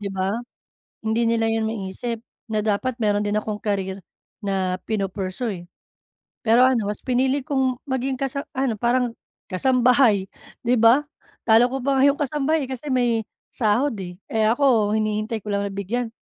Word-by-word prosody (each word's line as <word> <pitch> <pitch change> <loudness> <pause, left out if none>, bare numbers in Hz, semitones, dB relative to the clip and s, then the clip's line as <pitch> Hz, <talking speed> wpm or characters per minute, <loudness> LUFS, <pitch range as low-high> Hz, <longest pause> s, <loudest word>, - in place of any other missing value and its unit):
Di 200 -1 -4
ba? 190 +3 -1 0.7
Hindi 230 +1 +2
nila 225 -1 +1
yun 225 0 +1
maisip 225 +3 -4 0.3
na 215 - 0
dapat 220 +4 -1
meron 205 -2 +1
din 205 0 0
akong 210 0 -4
career 195 -2 -2 0.4
na 190 -2 0
pinu-pursue, 195 -1 -3
eh. - - -13 0.8
Pero 230 +3 +6
ano, 245 -5 +3
mas 210 - -4
pinili 260 +2 +1
kong 260 -2 0
maging 260 0 -1
kasa 275 +1 -3
ano 260 -5 0
parang 245 0 +1 0.4
kasambahay, 245 -2 +3 0.3
di 245 +1 +3
ba? 235 +6 +6 0.4
Talo 225 +2 +5
ko 265 +2 -3
pa 275 -1 +2
nga 275 - +6
yong 280 - +3
kasambahay 295 0 0
kasi 260 +3 -6
may 240 -4 +1 0.2
sahod, 230 +3 +1
eh. 180 -1 -6 0.2
Eh, 220 -1 +2
ako 225 -4 +3
hinihintay 215 0 -1
ko 210 - -4
lang 200 0 0
na - - -6
bigyan. 225 +5 -2
225 Hz, 165 wpm, -23 LUFS, 205-255 Hz, 0.8 s, Pero